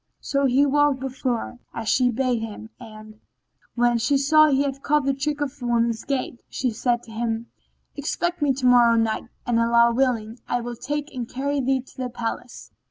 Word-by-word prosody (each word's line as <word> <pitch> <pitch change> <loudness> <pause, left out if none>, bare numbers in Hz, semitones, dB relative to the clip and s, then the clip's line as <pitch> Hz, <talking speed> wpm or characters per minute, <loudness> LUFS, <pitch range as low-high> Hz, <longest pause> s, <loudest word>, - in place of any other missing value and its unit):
"[FN#18] - - -51
So 275 -1 +1
he 265 +3 +4
walked 290 -1 +2
before 260 -2 -2
her, 245 - -8 0.2
as 230 -2 -5
she 250 +1 +3
bade 245 0 0
him; 220 0 -7
and, 215 -2 -12 0.6
when 240 -1 +2
she 245 +5 +2
saw 310 +3 +5
he 280 -1 +2
had 275 -1 -3
caught 300 -1 +1
the 275 - +2
trick 290 +2 -2
of 275 -2 -4
woman's 235 -2 0
gait, 260 -3 -3
she 255 -2 -1
said 240 +2 0
to 225 - -13
him, 225 0 -3 0.4
"Expect 345 +4 -2
me 290 -2 +3
tomorrow 250 -3 +4
night, 225 -1 0 0.2
and 240 -1 +1
Allah 235 0 +4
willing, 235 -3 0
I 245 - 0
will 240 0 -5
take 295 +5 -4
and 245 -3 -5
carry 280 +2 -1
thee 265 0 +1
to 260 - -20
the 255 -1 -3
palace. 240 0 -6
250 Hz, 195 wpm, -24 LUFS, 235-275 Hz, 0.6 s, saw